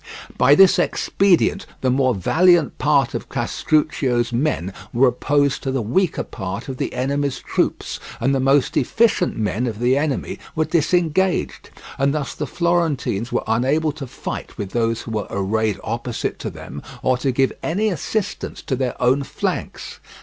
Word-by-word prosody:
By 145 Hz, -, +5 dB
this 195 Hz, +1 st, +6 dB
expedient 195 Hz, -3 st, +2 dB
the 130 Hz, -, +2 dB
more 130 Hz, -2 st, +2 dB
valiant 165 Hz, -, +3 dB
part 145 Hz, -2 st, +2 dB
of -, -, -5 dB
Castruccio's 130 Hz, -6 st, 0 dB
men 115 Hz, -, -1 dB, 0.2 s
were 125 Hz, +2 st, +4 dB
opposed 145 Hz, +2 st, +1 dB
to 135 Hz, -, -2 dB
the 130 Hz, -3 st, -1 dB
weaker 165 Hz, -, +1 dB
part 100 Hz, +3 st, -6 dB
of 130 Hz, -2 st, -5 dB
the -, -, -3 dB
enemy's 140 Hz, +1 st, -1 dB
troops, -, -, -2 dB, 0.2 s
and 135 Hz, +4 st, +1 dB
the 135 Hz, -, +1 dB
most 135 Hz, 0 st, +2 dB
efficient 215 Hz, -, +2 dB
men 110 Hz, +3 st, -1 dB
of 110 Hz, -3 st, -4 dB
the 120 Hz, +3 st, +2 dB
enemy 145 Hz, -1 st, -2 dB, 0.2 s
were 155 Hz, -, +1 dB
disengaged; 170 Hz, +3 st, +1 dB, 0.3 s
and 140 Hz, +2 st, +2 dB
thus 145 Hz, -3 st, -3 dB
the 150 Hz, -, -4 dB
Florentines 165 Hz, -, 0 dB
were 120 Hz, -, 0 dB
unable 135 Hz, +8 st, +1 dB
to 145 Hz, -2 st, -8 dB
fight -, -, -7 dB
with 100 Hz, -2 st, -5 dB
those 115 Hz, -1 st, 0 dB
who 115 Hz, -, -7 dB
were 105 Hz, -2 st, -2 dB
arrayed 105 Hz, +2 st, -1 dB
opposite 115 Hz, +1 st, -3 dB
to -, -, -4 dB
them, 70 Hz, +2 st, -9 dB, 0.2 s
or 130 Hz, -, +3 dB
to 135 Hz, +1 st, 0 dB
give 135 Hz, +1 st, +1 dB
any 205 Hz, +6 st, 0 dB
assistance 195 Hz, +4 st, -3 dB
to 135 Hz, -, -1 dB
their 130 Hz, -1 st, -2 dB
own 130 Hz, +3 st, +3 dB
flanks. 140 Hz, -, -4 dB
135 Hz, 165 wpm, -21 LUFS, 120-155 Hz, 0.3 s, this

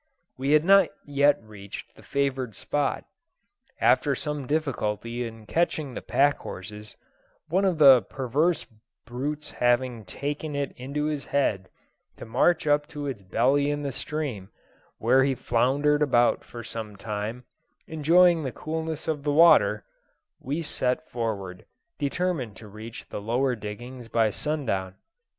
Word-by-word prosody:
We 135 Hz, +3 st, 0 dB
had 155 Hz, +1 st, +5 dB
not 195 Hz, -1 st, +6 dB, 0.2 s
yet 145 Hz, 0 st, +3 dB
reached 100 Hz, -2 st, -10 dB
the -, -, -16 dB
favoured 135 Hz, -4 st, -1 dB
spot. 145 Hz, -2 st, -1 dB, 0.7 s
After -, -, +3 dB
some 150 Hz, -3 st, -4 dB
difficulty 120 Hz, -5 st, -2 dB
in 115 Hz, -1 st, -11 dB
catching 155 Hz, -2 st, 0 dB
the -, -, -5 dB
pack 145 Hz, 0 st, +2 dB
horses, 105 Hz, +2 st, -8 dB, 0.5 s
one 190 Hz, +5 st, +2 dB
of 185 Hz, -4 st, +1 dB
the 135 Hz, -5 st, +8 dB
perverse 140 Hz, +9 st, 0 dB, 0.4 s
brutes 145 Hz, +5 st, -4 dB
having 120 Hz, -1 st, +1 dB
taken 145 Hz, +8 st, -4 dB
it 140 Hz, -1 st, -2 dB
into 140 Hz, +4 st, -3 dB
its 150 Hz, -2 st, -3 dB
head 100 Hz, -9 st, 0 dB, 0.5 s
to -, -, -8 dB
march 145 Hz, +10 st, +2 dB
up 145 Hz, 0 st, +2 dB
to 150 Hz, -2 st, -6 dB
its 130 Hz, -7 st, -4 dB
belly 130 Hz, +9 st, +2 dB
in 145 Hz, 0 st, -2 dB
the 140 Hz, -, -2 dB
stream, 135 Hz, -10 st, -4 dB, 0.5 s
where 130 Hz, +4 st, +4 dB
he 135 Hz, 0 st, +1 dB
floundered 140 Hz, +6 st, +2 dB
about 120 Hz, -5 st, +3 dB
for 120 Hz, -1 st, -9 dB
some 110 Hz, -2 st, -6 dB
time, 105 Hz, +4 st, -4 dB, 0.4 s
enjoying 165 Hz, +2 st, +4 dB
the 135 Hz, -4 st, -3 dB
coolness 160 Hz, +3 st, -4 dB
of 155 Hz, -3 st, -1 dB
the 145 Hz, 0 st, 0 dB
water, 165 Hz, +3 st, +5 dB, 0.5 s
we 150 Hz, +5 st, -3 dB
set 130 Hz, +1 st, -1 dB
forward, 100 Hz, -6 st, -4 dB, 0.4 s
determined 145 Hz, -, -1 dB
to 110 Hz, -, -12 dB
reach 110 Hz, +3 st, -10 dB
the -, -, -5 dB
lower 125 Hz, +4 st, +1 dB
diggings 120 Hz, +4 st, -8 dB
by 115 Hz, -1 st, +2 dB
sundown. 105 Hz, -10 st, -2 dB
135 Hz, 140 wpm, -26 LUFS, 115-150 Hz, 0.7 s, the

